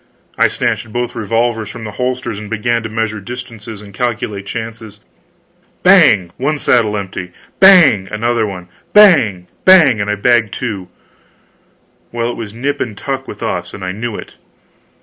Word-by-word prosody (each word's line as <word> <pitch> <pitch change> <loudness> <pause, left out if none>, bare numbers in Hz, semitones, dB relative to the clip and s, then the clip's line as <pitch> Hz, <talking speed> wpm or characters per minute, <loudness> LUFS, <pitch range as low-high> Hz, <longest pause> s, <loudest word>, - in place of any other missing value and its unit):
I - - +4
snatched 110 - -2
both 120 +1 -3
revolvers 115 0 -1
from 120 - -9
the 110 - -6
holsters 125 -1 -3
and 105 -1 -9
began 115 +1 -1
to 110 - -6
measure 110 -1 -2
distances 115 -1 -9
and 100 -1 -13
calculate 110 -2 -3
chances. 115 -1 -7 0.8
Bang! 90 -4 +5
One 150 +4 -1
saddle 110 -6 +2
empty. 95 -2 -6 0.3
Bang! 160 - +6
another 115 +1 0
one. 90 -3 -8 0.3
Bang 135 - +5 0.2
bang, 155 - +6
and 100 - -2
I 105 - +1
bagged 110 0 +1
two. 100 -7 -4 1.2
Well, 120 0 -2
it - - -7
was 110 -3 -7
nip 140 +6 -3
and 110 -5 -4
tuck 135 +2 -4
with 105 - -8
us, 90 0 -3
and 100 - -9
I 90 - -3
knew 110 +3 -5
it. - - -10
110 Hz, 160 wpm, -15 LUFS, 105-120 Hz, 1.2 s, Bang